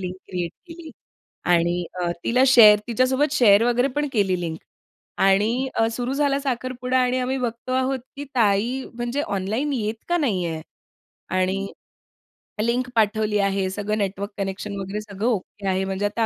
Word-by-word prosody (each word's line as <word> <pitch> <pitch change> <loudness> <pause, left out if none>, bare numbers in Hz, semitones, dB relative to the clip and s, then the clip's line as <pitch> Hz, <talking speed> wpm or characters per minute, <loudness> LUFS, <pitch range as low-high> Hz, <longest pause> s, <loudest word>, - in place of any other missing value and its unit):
Link 185 0 -5
create 175 -2 -3 0.2
केली. 330 -1 -10 0.6
आणि 175 0 +2 0.2
अ, 175 - 0
तिला 250 +2 +3
शेअर 215 -5 +8
तिच्यासोबत 260 +5 +1
शेअर 215 -6 +5
वगैरे 245 +2 +2
पण 295 0 0
केली 190 -5 +1
लिंक. 165 -2 -4 0.6
आणि 215 +7 +2
अ, 225 - +2
सुरू 245 +2 -3
झाला 280 -1 +1
साखरपुडा 255 -1 -2
आणि 250 0 +2
आम्ही 255 +1 -1
बघतो 240 0 -4
आहोत, 260 +1 0 0.2
की 285 - -5
ताई 230 +3 +2
म्हणजे 240 +3 -2 0.2
ऑनलाईन 220 +10 -2
येत 220 -3 -3
का 350 - +2
नाहीये. 180 - -1 0.7
आणि 185 +1 0 1.0
लिंक 245 +2 0
पाठवली 215 -1 +2
आहे, 195 -1 +1
सगळं 205 +2 -2
नेटवर्क 200 0 -3
कनेक्शन 200 +1 -4
वगैरे 195 +2 -4
सगळं 210 +1 -4
ओके 205 -3 -3
आहे 190 0 +1
म्हणजे 190 +1 -2
आता 215 +2 0
220 Hz, 155 wpm, -23 LUFS, 195-255 Hz, 1.0 s, शेअर